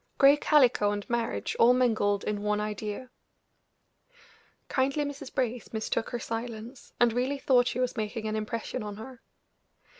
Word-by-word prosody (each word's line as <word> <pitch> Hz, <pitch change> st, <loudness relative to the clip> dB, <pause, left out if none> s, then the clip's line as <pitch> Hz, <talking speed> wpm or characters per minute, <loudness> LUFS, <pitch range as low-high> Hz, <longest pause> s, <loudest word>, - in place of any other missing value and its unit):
Gray 280 Hz, +1 st, +7 dB
calico 260 Hz, -8 st, +4 dB
and 205 Hz, -1 st, -4 dB
marriage 235 Hz, -1 st, -1 dB
all 240 Hz, +2 st, +7 dB
mingled 215 Hz, -5 st, +2 dB
in 210 Hz, -1 st, -2 dB
one 210 Hz, 0 st, 0 dB
idea! 210 Hz, +4 st, -4 dB, 1.6 s
Kindly 275 Hz, +3 st, +1 dB
Mrs. 285 Hz, -1 st, -7 dB
Brace 245 Hz, -4 st, -2 dB
mistook 220 Hz, +1 st, -2 dB
her 240 Hz, -, -3 dB
silence, 230 Hz, +2 st, -6 dB
and 240 Hz, -2 st, +4 dB
really 255 Hz, +4 st, 0 dB
thought 250 Hz, -3 st, +3 dB
she 250 Hz, -, -2 dB
was 255 Hz, -1 st, 0 dB
making 220 Hz, +1 st, -3 dB
an 215 Hz, -, -2 dB
impression 225 Hz, +3 st, -3 dB
on 210 Hz, -1 st, -6 dB
her. 240 Hz, +3 st, -10 dB
235 Hz, 150 wpm, -28 LUFS, 215-255 Hz, 1.6 s, Gray